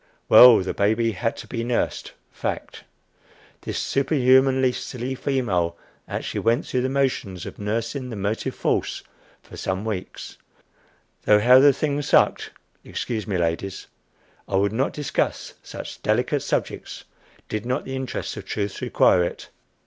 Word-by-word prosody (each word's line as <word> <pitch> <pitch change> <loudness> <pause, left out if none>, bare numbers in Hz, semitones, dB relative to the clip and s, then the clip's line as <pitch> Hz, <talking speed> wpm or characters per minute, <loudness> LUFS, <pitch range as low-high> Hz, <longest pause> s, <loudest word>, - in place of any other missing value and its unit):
Well, 125 -2 +10
the 95 - -3
baby 110 +3 +1
had 110 +3 -2
to - - -9
be 115 -2 -4
nursed 120 0 -2 0.2
fact! - - -5 0.8
This - - -4
superhumanly 130 -2 +3
silly 125 +1 -5
female 100 -12 -1 0.3
actually - - -4
went 115 +1 +1
through 125 - -1
the 130 - 0
motions 130 -9 -1
of - - -9
nursing 115 +5 -3
the 115 - -6
motive 100 +2 -3
force - - -1 0.4
for - - -13
some 95 +3 -3
weeks. 100 -4 -6 0.9
Though 105 0 +5
how 125 +4 +7
the 145 +1 +7
thing 145 +1 -1
sucked - - +2 0.3
Excuse 115 -3 -4
me, 100 -3 -1
ladies; 85 +3 -2 0.6
I 95 - -1
would 100 +2 +2
not 130 +5 0
discuss 150 -1 -2
such - - -9
delicate 125 +6 +1
subjects - - -3 0.4
did 110 -1 -3
not 125 +4 -2
the 135 - -5
interests 130 -1 -4
of - - -8
truth 100 -2 -4
require 90 - +3
it. 85 - -5
115 Hz, 145 wpm, -23 LUFS, 100-130 Hz, 0.9 s, Well